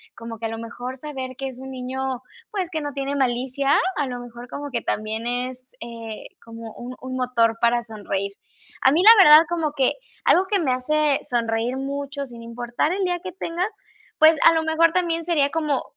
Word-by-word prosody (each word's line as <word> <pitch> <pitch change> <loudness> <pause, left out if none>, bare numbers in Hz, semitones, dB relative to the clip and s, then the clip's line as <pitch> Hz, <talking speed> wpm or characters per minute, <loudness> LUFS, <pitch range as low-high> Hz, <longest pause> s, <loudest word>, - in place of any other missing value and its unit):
como 230 0 -8
que 225 - -5
a - - -1
lo 225 - -5
mejor 245 +3 -6
saber 260 -3 -6
que 270 - -3
es 255 -1 -8
un 265 0 -8
niño, 260 0 -4 0.3
pues, 380 -4 -2
que 315 -3 -3
no 290 -1 -4
tiene 275 +1 -2
malicia. 265 +2 +1 0.2
A 290 - +1
lo 250 -2 -5
mejor 240 0 -10
como 285 +3 -6
que 240 -3 -2
también 215 +2 -2
es, 250 +1 -3
eh, 230 -2 -8 0.2
como 230 -1 -9
un 250 +1 -8
un 255 0 -5
motor 235 -3 +1
para 240 0 +2
sonreír. 200 -3 -4 0.5
A 265 - +5
mí, 325 +5 +3
la 435 -2 +9
verdad, 305 +1 +9
como 330 -3 -1
que 265 -3 +2 0.3
algo 370 +2 +4
que 400 0 +1
me 280 -6 +1
hace 290 +3 +1
sonreír 235 +1 -1
mucho, 280 +1 -4
sin 235 -2 -11
importar 240 +6 -2
el 390 +1 -1
día 355 -1 0
que 370 - -5
tenga, 350 0 -2 0.5
pues, 315 0 +7
a 330 - +7
lo 325 - +2
mejor 320 +1 +3
también 335 -2 0
sería 305 -5 +2
como 300 -4 -1
260 Hz, 205 wpm, -23 LUFS, 240-305 Hz, 0.5 s, la